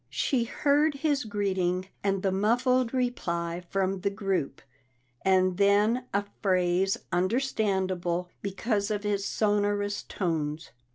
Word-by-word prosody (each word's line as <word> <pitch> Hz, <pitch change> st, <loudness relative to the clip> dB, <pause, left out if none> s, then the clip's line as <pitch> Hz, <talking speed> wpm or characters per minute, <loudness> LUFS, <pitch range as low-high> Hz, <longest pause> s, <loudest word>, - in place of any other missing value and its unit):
She 235 Hz, -, 0 dB
heard 290 Hz, +4 st, +2 dB
his 280 Hz, -3 st, 0 dB
greeting 190 Hz, -3 st, -1 dB
and 195 Hz, -1 st, 0 dB
the 195 Hz, -, +2 dB
muffled 240 Hz, +5 st, +2 dB
reply 175 Hz, -9 st, -2 dB
from 195 Hz, 0 st, 0 dB
the 200 Hz, -, +1 dB
group, 195 Hz, -9 st, -2 dB, 0.6 s
and 185 Hz, -1 st, +3 dB
then 210 Hz, +5 st, +3 dB
a 200 Hz, +1 st, 0 dB, 0.2 s
phrase 185 Hz, 0 st, +2 dB
understandable 185 Hz, -4 st, 0 dB
because 200 Hz, +1 st, -1 dB
of 210 Hz, -1 st, -2 dB
his 205 Hz, -1 st, 0 dB
sonorous 205 Hz, -1 st, 0 dB
tones. 160 Hz, -4 st, -3 dB
200 Hz, 115 wpm, -28 LUFS, 185-220 Hz, 0.6 s, and